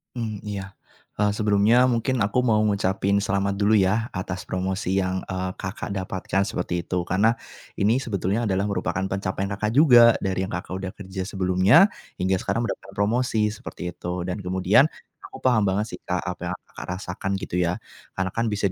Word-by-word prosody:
Mmm, 110 Hz, -4 st, -3 dB
iya, 100 Hz, -1 st, -5 dB, 0.5 s
eee, 105 Hz, -1 st, +3 dB
sebelumnya 105 Hz, +3 st, +4 dB
mungkin 120 Hz, 0 st, 0 dB
aku 105 Hz, +5 st, +1 dB
mau 110 Hz, -4 st, +3 dB
ngucapin 100 Hz, -1 st, +1 dB
selamat 100 Hz, 0 st, 0 dB
dulu 105 Hz, +2 st, +4 dB
ya 105 Hz, +3 st, +2 dB
atas 90 Hz, 0 st, -4 dB
promosi 95 Hz, +1 st, -1 dB
yang, 95 Hz, 0 st, -1 dB
eee, 95 Hz, 0 st, -3 dB
Kakak 95 Hz, +1 st, -5 dB
dapatkan 95 Hz, 0 st, -1 dB
seperti 90 Hz, -2 st, -2 dB
itu 90 Hz, -1 st, -1 dB
karena, 105 Hz, +7 st, +2 dB, 0.4 s
ini 110 Hz, +6 st, +2 dB
sebetulnya 105 Hz, -1 st, -1 dB
adalah 95 Hz, 0 st, +1 dB
merupakan 95 Hz, -1 st, -1 dB
pencapaian 95 Hz, 0 st, -2 dB
Kakak 105 Hz, +2 st, -1 dB
juga. 120 Hz, -6 st, +8 dB
Dari 95 Hz, 0 st, 0 dB
yang -, -, -8 dB
Kakak 90 Hz, +1 st, -4 dB
udah 95 Hz, -1 st, -4 dB
kerja 95 Hz, -1 st, -5 dB
sebelumnya 95 Hz, -, +4 dB, 0.3 s
hingga 95 Hz, +1 st, +1 dB
sekarang 115 Hz, -, -1 dB
mendapat 95 Hz, -4 st, -5 dB
promosi 110 Hz, +1 st, +1 dB
seperti 90 Hz, -4 st, -7 dB
itu 90 Hz, 0 st, -4 dB
dan 90 Hz, +3 st, -3 dB
kemudian 95 Hz, -, +3 dB, 0.4 s
aku 130 Hz, -, -12 dB
paham 110 Hz, -6 st, +3 dB
banget 100 Hz, +3 st, +1 dB
sih, -, -, -7 dB
Kak, 90 Hz, 0 st, -1 dB
apa 90 Hz, -1 st, -5 dB
yang 90 Hz, -, -2 dB, 0.2 s
Kakak -, -, -8 dB
rasakan 95 Hz, 0 st, -4 dB
gitu 95 Hz, -2 st, -3 dB
ya, 90 Hz, 0 st, +1 dB, 0.4 s
karena 95 Hz, 0 st, -1 dB
kan 115 Hz, 0 st, -1 dB
bisa 100 Hz, -3 st, 0 dB
100 Hz, 175 wpm, -24 LUFS, 95-110 Hz, 0.5 s, juga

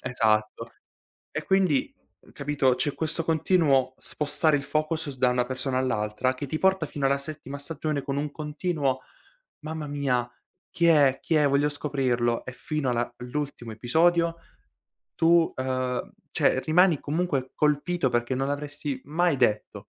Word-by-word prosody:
Esatto. 110 Hz, -4 st, 0 dB, 0.6 s
E -, -, -3 dB
quindi, 265 Hz, +10 st, +2 dB, 0.3 s
uhm, -, -, -20 dB
capito? 140 Hz, -3 st, +1 dB
C'è 140 Hz, +3 st, -1 dB
questo 160 Hz, 0 st, -2 dB
continuo 150 Hz, -6 st, +2 dB
spostare 150 Hz, +1 st, +1 dB
il 140 Hz, -, -1 dB
focus 155 Hz, +1 st, -1 dB
s 130 Hz, -, -8 dB
da 125 Hz, -, +3 dB
una 125 Hz, 0 st, +2 dB
persona 130 Hz, 0 st, -2 dB
all'altra, 110 Hz, 0 st, 0 dB
che 130 Hz, +2 st, -5 dB
ti 155 Hz, +3 st, -3 dB
porta 190 Hz, -3 st, +3 dB
fino 145 Hz, -2 st, -3 dB
alla 140 Hz, +1 st, +2 dB
settima 140 Hz, -1 st, -6 dB
stagione 150 Hz, 0 st, -3 dB
con 140 Hz, -1 st, -3 dB
un 145 Hz, 0 st, -2 dB
continuo: 150 Hz, -3 st, -2 dB, 0.7 s
"Mamma 155 Hz, -1 st, -4 dB
mia, 130 Hz, -4 st, -1 dB, 0.4 s
chi 170 Hz, 0 st, +3 dB
è, 145 Hz, -5 st, +5 dB
chi 165 Hz, -, 0 dB
è, 150 Hz, -1 st, +4 dB
voglio 140 Hz, +2 st, +3 dB
scoprirlo!" 130 Hz, -5 st, -1 dB
E 125 Hz, -, -6 dB
fino 150 Hz, +1 st, -2 dB
alla 120 Hz, 0 st, -1 dB
l'ultimo 125 Hz, -2 st, -5 dB
episodio, 165 Hz, +8 st, +2 dB, 0.8 s
tu 165 Hz, 0 st, +4 dB
uhm, 130 Hz, -1 st, -2 dB, 0.2 s
cioè 130 Hz, -, +2 dB
rimani 165 Hz, 0 st, +4 dB
comunque 145 Hz, -4 st, -2 dB
colpito 150 Hz, 0 st, +1 dB
perché 120 Hz, +2 st, 0 dB
non 135 Hz, +1 st, -1 dB
l'avresti 145 Hz, -1 st, -4 dB
mai 165 Hz, +2 st, +1 dB
detto. 105 Hz, -3 st, 0 dB
145 Hz, 150 wpm, -26 LUFS, 130-155 Hz, 0.8 s, è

